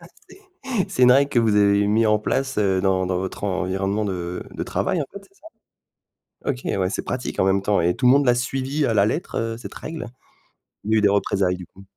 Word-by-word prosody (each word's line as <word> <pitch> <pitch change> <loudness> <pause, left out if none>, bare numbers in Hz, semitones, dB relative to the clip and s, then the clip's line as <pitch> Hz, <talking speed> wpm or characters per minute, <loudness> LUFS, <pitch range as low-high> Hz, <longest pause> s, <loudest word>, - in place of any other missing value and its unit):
ah - - -14 0.2
c'est - - -15 0.5
c'est 125 - -1
une 125 - +7
règle 140 +2 +3
que 125 - +2
vous 110 -2 +2
avez 100 0 +4
mis 110 +2 +2
en 105 0 +3
place, 135 +3 -2
heu, 95 -3 +2
dans 95 -1 +1
dans 90 -1 -1
votre 95 +2 -5
environnement 95 +2 -1
de 90 -3 -4
de - - -6
travail, 185 -3 -1
en - - -1
fait, 200 - -8
c'est 195 0 -26
ça? - - -16 1.0
OK, 130 -3 -1
ouais, 95 -2 -1
c'est - - -3
pratique 125 0 -3
en - - +4
même 95 0 +2
temps 100 0 +1
et 90 +1 +1
tout 125 - +1
le 125 - +7
monde 140 0 +3
l'a 125 - +5
suivi 135 +4 -1
à 115 - 0
la 100 -1 +4
lettre, - - -3
heu, 115 0 -2
cette 120 - -10
règle? 155 -6 -6 0.8
Il 105 - -3
y - - +4
a - - +4
eu - - -1
des 105 - +4
représailles, 100 -2 +1
du 90 - -9
coup? 95 - -17
105 Hz, 250 wpm, -22 LUFS, 95-125 Hz, 1.0 s, une